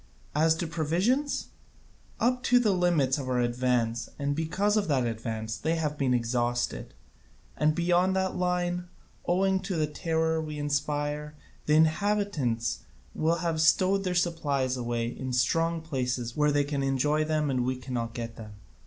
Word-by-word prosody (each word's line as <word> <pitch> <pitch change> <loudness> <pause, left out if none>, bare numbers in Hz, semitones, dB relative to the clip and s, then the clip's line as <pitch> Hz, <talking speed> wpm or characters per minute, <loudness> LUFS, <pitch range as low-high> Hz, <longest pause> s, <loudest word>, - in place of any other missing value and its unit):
As 160 +2 +3
to 165 - -3
provisions, 180 - 0 0.7
up 250 +1 +2
to 245 - +5
the 235 -4 +3
limits 170 -7 +2
of 130 -2 -4
our 125 -1 +1
advance 120 -1 0
and 145 0 -1
because 185 +7 0
of 210 -2 +1
that 135 -5 +1
advance 110 -1 -3
they 160 +8 0
have 155 -2 -1
been 135 -3 0
exhausted; 120 - -1 0.6
and 155 0 +2
beyond 175 +2 +2
that 190 0 0
line, 180 0 -1 0.4
owing 190 +2 +2
to 190 0 -4
the 155 -2 +2
terror 160 +1 0
we 155 -1 -5
inspire, 145 0 -2 0.3
the 150 - +4
inhabitants 160 - +1 0.3
will 160 +2 +1
have 160 -2 0
stowed 190 +4 +3
their 180 -2 -1
supplies 145 -7 0
away 120 -1 -2
in 130 +2 -5
strong 165 +6 +1
places 125 -5 -2
where 150 -1 +3
they 145 0 +2
can 140 -1 -2
enjoy 135 +3 +1
them 155 -2 0
and 125 -2 0
we 130 +1 0
cannot 120 -2 -4
get 115 -2 -5
them. 110 -2 -9
150 Hz, 160 wpm, -28 LUFS, 125-175 Hz, 0.7 s, to